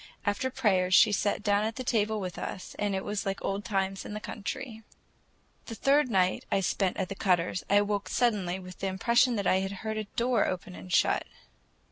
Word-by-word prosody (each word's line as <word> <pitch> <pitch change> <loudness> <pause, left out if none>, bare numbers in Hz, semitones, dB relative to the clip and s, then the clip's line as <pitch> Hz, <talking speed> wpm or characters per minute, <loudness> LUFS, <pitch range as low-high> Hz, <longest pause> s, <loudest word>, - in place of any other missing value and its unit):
After 205 +5 0
prayers 190 -8 +2
she 220 - +7
sat 205 +1 0
down 205 0 +2
at 220 +1 -2
the 255 - -4
table 220 -3 +1
with 185 -3 -5
us, 185 - -6
and 205 -1 0
it 190 - -3
was 205 0 -2
like 195 0 -2
old 195 +1 -2
times 195 -2 -1
in 210 - -7
the - - -3
country. 220 +2 -6 0.9
The 225 - -6
third 275 +2 +3
night 185 -4 +2
I - - +3
spent 185 +1 0
at 190 - -1
the 195 - -5
Cutters', 180 -2 0
I 200 - +4
awoke 205 0 +1
suddenly 205 -7 +1
with 185 -1 -11
the 195 - -2
impression 235 +6 +3
that 200 -2 -2
I 185 - +4
had 195 0 -2
heard 220 0 -2
a 215 - -2
door 235 +2 +1
open 180 - -4
and 90 0 -10
shut. - - +2
205 Hz, 210 wpm, -29 LUFS, 190-220 Hz, 0.9 s, she